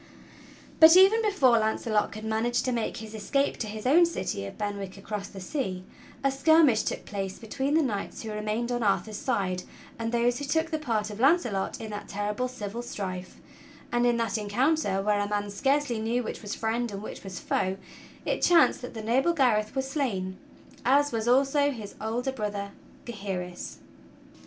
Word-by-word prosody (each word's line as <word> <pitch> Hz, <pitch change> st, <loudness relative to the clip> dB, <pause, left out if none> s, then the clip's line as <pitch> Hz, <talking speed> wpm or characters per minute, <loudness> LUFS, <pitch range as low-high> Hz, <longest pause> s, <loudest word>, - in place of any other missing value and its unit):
But 320 Hz, +2 st, +10 dB
even 390 Hz, +4 st, +7 dB
before 290 Hz, -, +4 dB
Launcelot 220 Hz, 0 st, 0 dB
could 215 Hz, +1 st, -8 dB
manage 225 Hz, +2 st, 0 dB
to 255 Hz, -, 0 dB
make 235 Hz, -2 st, -2 dB
his 220 Hz, -1 st, -8 dB
escape 275 Hz, +6 st, 0 dB
to 220 Hz, -, -3 dB
his 215 Hz, +1 st, -7 dB
own 335 Hz, +7 st, +6 dB
city 185 Hz, -, -3 dB
of -, -, -10 dB
Ben 205 Hz, -1 st, -3 dB
wick 195 Hz, 0 st, -7 dB
across 200 Hz, 0 st, -5 dB
the 195 Hz, -, -10 dB
sea, 185 Hz, -3 st, -3 dB, 0.4 s
a 275 Hz, -, +3 dB
skirmish 275 Hz, -3 st, +5 dB
took -, -, -4 dB
place 195 Hz, -2 st, -4 dB
between 265 Hz, +6 st, -2 dB
the 320 Hz, -, +4 dB
knights 210 Hz, -5 st, -3 dB
who 220 Hz, -, -5 dB
remained 215 Hz, +3 st, -2 dB
on 240 Hz, 0 st, -1 dB
Arthur's 210 Hz, 0 st, 0 dB
side 195 Hz, -8 st, -1 dB, 0.4 s
and 225 Hz, 0 st, -2 dB
those 240 Hz, +1 st, +1 dB
who 285 Hz, -, -4 dB
took 320 Hz, +3 st, 0 dB
the 315 Hz, -, -1 dB
part 220 Hz, -7 st, -1 dB
of 210 Hz, -, -8 dB
Launcelot 260 Hz, -, +2 dB
in 220 Hz, -1 st, -6 dB
that 205 Hz, -, -6 dB
terrible 210 Hz, +5 st, -2 dB
civil 230 Hz, -2 st, -6 dB
strife; 185 Hz, -6 st, -6 dB, 0.5 s
and 240 Hz, 0 st, +2 dB
in 240 Hz, -1 st, +2 dB
that 230 Hz, -1 st, -1 dB
encounter, 210 Hz, -1 st, +1 dB
where 210 Hz, 0 st, +2 dB
a 205 Hz, 0 st, -1 dB
man 205 Hz, -1 st, -2 dB
scarcely 270 Hz, +2 st, +1 dB
knew 235 Hz, +3 st, 0 dB
which -, -, -5 dB
was 205 Hz, -2 st, -5 dB
friend 230 Hz, +1 st, -1 dB
and 200 Hz, +1 st, -6 dB
which -, -, -8 dB
was 190 Hz, -2 st, -6 dB
foe, 190 Hz, 0 st, -1 dB, 0.5 s
it -, -, -1 dB
chanced 340 Hz, -6 st, +5 dB
that 245 Hz, -1 st, -8 dB
the 220 Hz, -, -5 dB
noble 260 Hz, +9 st, +2 dB
Gareth 235 Hz, -7 st, +2 dB
was 265 Hz, 0 st, -1 dB
slain, 200 Hz, -10 st, -2 dB, 0.4 s
as 285 Hz, +3 st, +4 dB
was 225 Hz, -1 st, -2 dB
also 275 Hz, +3 st, +4 dB
his 220 Hz, -7 st, -6 dB
older 235 Hz, +4 st, -1 dB
brother 205 Hz, -5 st, -4 dB, 0.3 s
Gaheris. 190 Hz, -5 st, -5 dB
225 Hz, 185 wpm, -27 LUFS, 205-265 Hz, 0.5 s, But